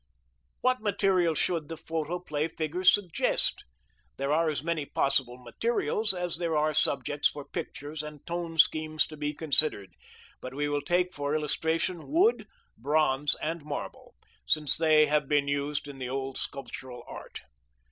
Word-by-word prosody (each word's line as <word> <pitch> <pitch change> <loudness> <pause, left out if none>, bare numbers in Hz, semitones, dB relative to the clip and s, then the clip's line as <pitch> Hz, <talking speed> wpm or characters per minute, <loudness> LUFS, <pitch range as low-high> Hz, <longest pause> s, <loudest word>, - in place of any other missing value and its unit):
What 255 -1 +2
materials 190 -6 +2
should 165 -4 -1
the 165 - -5
photoplay 160 -1 -3
figures 165 +3 +2
suggest? 185 -6 0 0.5
There 140 +1 -1
are 160 +1 +3
as 150 -2 -3
many 165 -2 -1
possible 135 -3 0
materials 215 - 0
as 180 -2 -1
there 165 -3 0
are 155 +1 +2
subjects 145 +1 +2
for 145 -1 -8
pictures 145 +2 -5
and 150 -1 -10
tone 170 -1 -4
schemes 155 0 +4
to 155 - -10
be 150 0 -2
considered. 145 - +2 0.5
But 130 +1 -7
we 145 +1 0
will 145 0 -1
take 180 +4 +1
for 145 +1 -2
illustration 160 +2 -1
wood, 370 +10 +3 0.3
bronze, 145 +2 +1
and 165 0 -3
marble, 145 -1 -7 0.3
since 150 -3 +3
they 155 -1 +5
have 150 -1 +1
been 145 -1 +2
used 145 0 -1
in 140 -2 -9
the 125 -1 -4
old 135 0 -3
sculptural 130 -3 -4
art. - - -9
155 Hz, 150 wpm, -28 LUFS, 145-165 Hz, 0.5 s, they